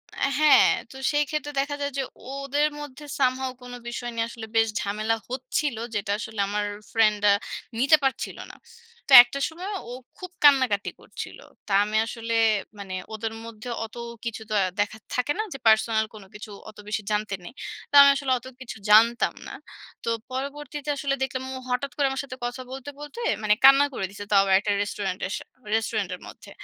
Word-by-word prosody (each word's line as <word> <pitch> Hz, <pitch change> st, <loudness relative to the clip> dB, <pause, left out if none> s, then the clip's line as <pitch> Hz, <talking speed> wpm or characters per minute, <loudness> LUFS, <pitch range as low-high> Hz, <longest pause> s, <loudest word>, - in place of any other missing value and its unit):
আ -, -, +1 dB
হ্যাঁ, 305 Hz, -1 st, +7 dB, 0.2 s
তো -, -, -13 dB, 0.2 s
সেইক্ষেত্রে 295 Hz, 0 st, -1 dB
দেখা 285 Hz, +1 st, -1 dB
যায় 285 Hz, 0 st, -1 dB
যে, -, -, +1 dB, 0.3 s
ওদের 275 Hz, +2 st, 0 dB
মধ্যে 295 Hz, 0 st, -9 dB, 0.2 s
somehow 260 Hz, 0 st, +1 dB
কোন 245 Hz, 0 st, -10 dB
বিষয় 240 Hz, 0 st, -4 dB
নিয়ে 230 Hz, 0 st, 0 dB
আসলে 230 Hz, -1 st, -8 dB
বেশ 225 Hz, 0 st, +4 dB
ঝামেলা 215 Hz, +3 st, -1 dB
হচ্ছিল, 255 Hz, +1 st, -2 dB, 0.2 s
যেটা 200 Hz, -1 st, -1 dB
আসলে 220 Hz, -2 st, -6 dB
আমার 205 Hz, +1 st, -1 dB, 0.3 s
ফ্রেন্ড 215 Hz, -2 st, +3 dB
আ -, -, +6 dB, 0.5 s
নিতে 280 Hz, +5 st, +6 dB
পারছিল 270 Hz, -, -1 dB
না। -, -, -15 dB, 0.5 s
তো 270 Hz, -, +9 dB
একটা 245 Hz, +3 st, -6 dB
সময় 350 Hz, +5 st, -7 dB, 0.2 s
ও -, -, -7 dB, 0.3 s
খুব 365 Hz, -1 st, -8 dB
কান্নাকাটি 260 Hz, -8 st, +5 dB
করছিল। -, -, -8 dB, 0.3 s
তো -, -, -7 dB
আমি 210 Hz, +1 st, -4 dB
আসলে 230 Hz, 0 st, -4 dB, 0.5 s
মানে 195 Hz, -2 st, -7 dB, 0.2 s
ওদের 220 Hz, +1 st, -4 dB
মধ্যে 230 Hz, +1 st, -9 dB, 0.2 s
অত 220 Hz, +1 st, -13 dB, 0.3 s
কিছু 230 Hz, -1 st, -4 dB
তো -, -, -3 dB, 0.3 s
দেখা 205 Hz, +1 st, 0 dB
আ -, -, -67 dB
থাকে 250 Hz, +3 st, 0 dB
না? -, -, +2 dB
যে -, -, -6 dB
পার্সোনাল 220 Hz, 0 st, +4 dB
কোনো 200 Hz, -3 st, -12 dB
কিছু 210 Hz, +1 st, -9 dB, 0.2 s
অত 215 Hz, -, -15 dB
বেশি 210 Hz, 0 st, -2 dB
জানতে 210 Hz, -1 st, 0 dB
নেই। 175 Hz, -, -10 dB, 0.4 s
তো -, -, -54 dB
আমি 280 Hz, -, +9 dB
আসলে 270 Hz, -1 st, -2 dB
অত 240 Hz, -, -19 dB, 0.2 s
কিছু 250 Hz, -3 st, -7 dB
জানতাম 230 Hz, +3 st, +5 dB
না। -, -, -8 dB, 0.5 s
তো -, -, -2 dB, 0.2 s
পরবর্তীতে 290 Hz, +2 st, -5 dB
আসলে 275 Hz, -1 st, -1 dB
দেখলাম 260 Hz, 0 st, -3 dB
ও -, -, -6 dB
হঠাৎ 250 Hz, +3 st, -1 dB
করে 285 Hz, -, +1 dB
আমার 270 Hz, 0 st, -2 dB
সাথে 255 Hz, -2 st, -9 dB
কথা 245 Hz, +2 st, -4 dB
বলতে, 270 Hz, +1 st, -7 dB
বলতে 295 Hz, +10 st, -9 dB, 0.2 s
মানে 210 Hz, 0 st, +4 dB
কান্না 275 Hz, +1 st, +8 dB
করে 195 Hz, -, -2 dB
দিছে। 200 Hz, +1 st, -8 dB
তাও 200 Hz, -, +6 dB
আবার 195 Hz, -1 st, +3 dB
একটা 205 Hz, -, -1 dB
রেস্টুরেন্ট 200 Hz, -2 st, -3 dB, 0.2 s
স -, -, -2 dB, 0.4 s
রেস্টুরেন্টের 210 Hz, -4 st, -1 dB
মধ্যে। -, -, -13 dB
245 Hz, 185 wpm, -25 LUFS, 215-275 Hz, 0.5 s, তো